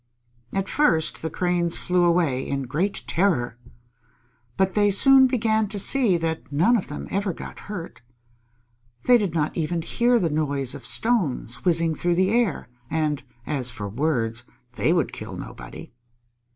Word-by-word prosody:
At 195 0 -2
first 165 - +1
the 160 - -3
Cranes 175 -1 0
flew 180 -1 +1
away 170 -7 +2
in 140 0 -2
great 160 +11 -2
terror. 130 -11 0 1.0
But 190 -1 +1
they 205 -1 +3
soon 265 +6 +6
began 220 -4 +1
to 205 +1 -4
see 210 -2 +4
that 160 -2 -4
none 175 +12 +3
of 210 - -1
them 145 - -7
ever 195 -1 -1
got - - -9
hurt. 180 -10 -7 1.0
They 245 -1 +6
did 190 -6 -2
not 155 -1 0
even 165 0 -2
hear 240 +6 +2
the 170 -8 0
noise 140 -4 -1
of - - -9
stones 160 - 0
whizzing 165 -2 +2
through 175 +2 0
the 185 +2 +2
air, 230 - 0 0.2
and 150 -2 -1 0.2
as 135 -5 -1
for 105 -4 -6
words, 120 -1 -1 0.3
they 150 - +1
would 170 -5 +1
kill - - -7
nobody. - - -10
170 Hz, 155 wpm, -24 LUFS, 150-200 Hz, 1.0 s, soon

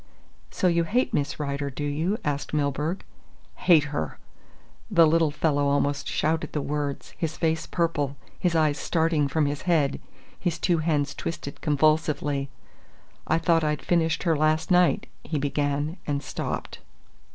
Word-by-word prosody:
"So - - -3
you 170 -1 +2
hate 245 +9 0
Miss 145 +1 -1
Rider, 140 -1 -2
do 140 +2 -6
you?" 160 +8 0
asked 145 +1 -2
Milburgh. 150 +5 -1 0.5
"Hate 165 -5 +5
her!" 80 - -3 0.7
The 165 -1 +6
little 160 0 +3
fellow 145 -1 +1
almost 145 0 0
shouted 155 0 -1
the 150 - 0
words, 145 -1 -3
his 160 -2 -2
face 160 -1 0
purple, 145 -5 -1 0.2
his 175 -3 +1
eyes 155 -3 +2
starting 160 -3 +1
from 150 +2 +1
his 145 0 -2
head, 150 -5 +2 0.4
his 175 -3 -1
two 175 -3 +1
hands 150 -3 0
twisted 140 -4 -6
convulsively. 150 -2 +1 0.8
"I 160 - +3
thought 165 0 +2
I'd 150 -1 -1
finished 165 -3 +1
her 165 -3 +2
last 155 +4 +1
night," 180 -1 +4 0.2
he 155 - -3
began, 145 +3 -1
and 145 -1 -1
stopped. - - -4
155 Hz, 150 wpm, -26 LUFS, 145-165 Hz, 0.8 s, The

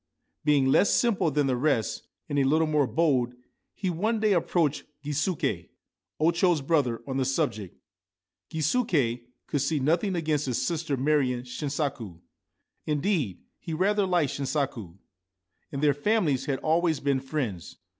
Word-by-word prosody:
Being 145 -3 +3
less 135 +9 +4
simple 220 -8 +2
than 145 0 +1
the 130 -2 +1
rest, 115 -5 0 0.2
and 145 -2 0
a - - +4
little 155 +4 +3
more 150 -3 +2
bold, 130 -7 +1 0.4
he 185 -3 -2
one 215 +7 0
day 215 -1 +3
approached 165 -4 +1 0.2
Gisuke, 145 - -1 0.5
O 160 +2 +4
Cho's 170 -2 +2
brother, 135 -7 +1
on 135 -1 -3
the 135 - +2
subject. 130 - -2 0.7
Gisuke 155 - 0 0.2
could 145 - -1
see 150 +2 0
nothing 170 +8 +1
against 155 -4 0
his 125 - 0
sister 160 -4 -1
marrying 130 -3 +1
Shinsaku; 130 - -4 0.7
indeed, 150 - -1 0.2
he 165 - -5
rather 200 +3 +2
liked 175 -7 +1
Shinsaku; 130 - -3 0.7
and 140 +1 -4
their 145 -1 +5
families 155 - +1
had 135 -2 -1
always 160 -1 +2
been 140 -1 +1
friends. 130 - -4
145 Hz, 145 wpm, -27 LUFS, 130-165 Hz, 0.7 s, their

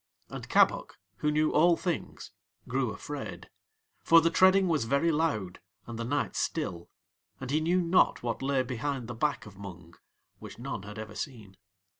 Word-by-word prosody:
And - - -8
Kabok, - - +3 0.2
who 150 - 0
knew 155 +1 +2
All 170 +2 +5
Things, 175 - -4 0.4
grew - - 0
afraid, - - -7 0.5
for 165 - +7
the 165 0 +2
treading 190 +2 +5
was 155 -9 +1
very 140 +8 +2
loud 115 - -1 0.3
and 115 -1 -7
the - - -2
night 140 +5 -1
still, 95 - -2 0.5
and 130 0 -5
he 155 +2 +2
knew 175 +3 +2
not 170 -5 +3
what 120 0 -2
lay 135 -1 +1
behind 130 0 -3
the 120 - -5
back 140 +5 -1
of 100 -3 -13
Mung, 90 -4 -10 0.5
which - - -10
none - - -5
had 105 +2 -9
ever 110 -1 -7
seen. 110 -6 -7
140 Hz, 170 wpm, -29 LUFS, 110-165 Hz, 0.5 s, for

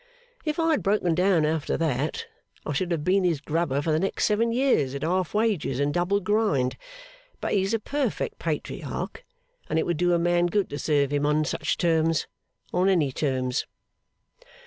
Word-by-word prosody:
If 305 -1 -1
I 330 -1 +2
had 305 - +2
broken 195 -4 +1
down 180 -2 +3
after 155 -1 -1
that, 155 - -1 0.4
I - - -2
should 185 -3 -1
have 160 -3 -1
been 190 +3 +2
his 170 -5 +1
grubber 150 -2 -1
for 160 - 0
the 155 - +2
next 195 +3 0
seven 225 +2 +2
years 230 - +2
at 140 - -4
half 180 +3 0
wages 205 - 0
and 145 +1 +1
double 175 +4 +1
grind. 200 - +1 0.6
But - - -3
he's 195 0 +1
a - - -1
perfect 285 +6 -2
Patriarch; - - -4 0.5
and 160 - 0
it 160 - +1
would 175 -2 -1
do 175 +1 +2
a - - +4
man 175 +1 +2
good 200 +2 0
to 145 - -4
serve 145 -3 +1
him 145 0 +1
on 150 +1 +2
such 145 -1 -1
terms 165 -1 +2 0.5
on 180 +2 +3
any 160 -8 +2
terms. 130 -2 -1
170 Hz, 185 wpm, -26 LUFS, 150-195 Hz, 0.6 s, a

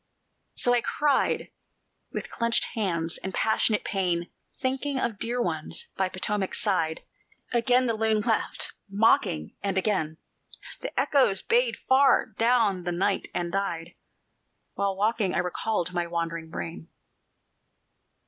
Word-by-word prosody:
So 245 0 +3
cried 290 +2 +1
I - - -15 0.6
with - - -5
clenched 235 0 +1
hands 170 -6 0
and 190 - -5
passionate 220 -1 +2
pain, 180 -3 -1 0.3
Thinking 265 +2 -1
of 230 -6 -2
dear 240 +2 -1
ones 160 -8 -2
by 190 -1 0
Potomac's 190 +1 -1
side; 165 -6 0 0.5
Again 245 +1 +3
the 230 - +1
loon 220 -1 +1
laughed 225 0 -1 0.2
mocking, 195 - +2
and 195 -1 -1
again 185 -6 0 0.6
The - - -3
echoes 260 -9 +3
bayed 480 +1 +2
far 270 +1 +4
down 230 -5 +3
the 175 - -2
night 190 +3 0
and 175 -1 -1
died, 170 -4 -2 0.8
While 195 -1 -1
waking 210 -2 +1
I - - +1
recalled 180 0 -1
my 175 -1 -1
wandering 165 -1 -3
brain. 165 0 -6
200 Hz, 130 wpm, -27 LUFS, 175-235 Hz, 0.8 s, far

